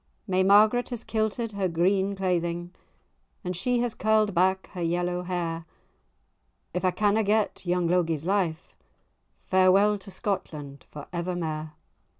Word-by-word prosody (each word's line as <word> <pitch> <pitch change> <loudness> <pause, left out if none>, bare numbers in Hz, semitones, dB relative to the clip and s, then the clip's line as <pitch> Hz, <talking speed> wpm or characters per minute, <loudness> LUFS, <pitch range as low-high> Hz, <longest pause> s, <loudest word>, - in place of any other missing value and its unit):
May 185 -2 +1
Margaret 210 +5 +5
has 240 -3 -5
kilted 220 +1 -1
her 200 -2 -1
green 190 +4 +1
cleiding,[#] 175 -2 -1 0.7
And 180 -1 -3
she 245 +7 0
has 240 -2 -1
curl'd 215 -1 +2
back 190 +2 +2
her 180 - -5
yellow 175 +1 -1
hair— 170 -2 -3 1.1
"If 180 - -2
I 185 - +4
canna 205 +4 +2
get 210 -2 0
young 175 -1 +1
Logie's 165 -3 0
life, 180 -4 -1 0.7
Farewell 195 +3 +4
to 195 +1 -12
Scotland 150 -9 -4
for 145 -1 -9
evermair." 165 -3 -3
185 Hz, 135 wpm, -26 LUFS, 175-205 Hz, 1.1 s, Margaret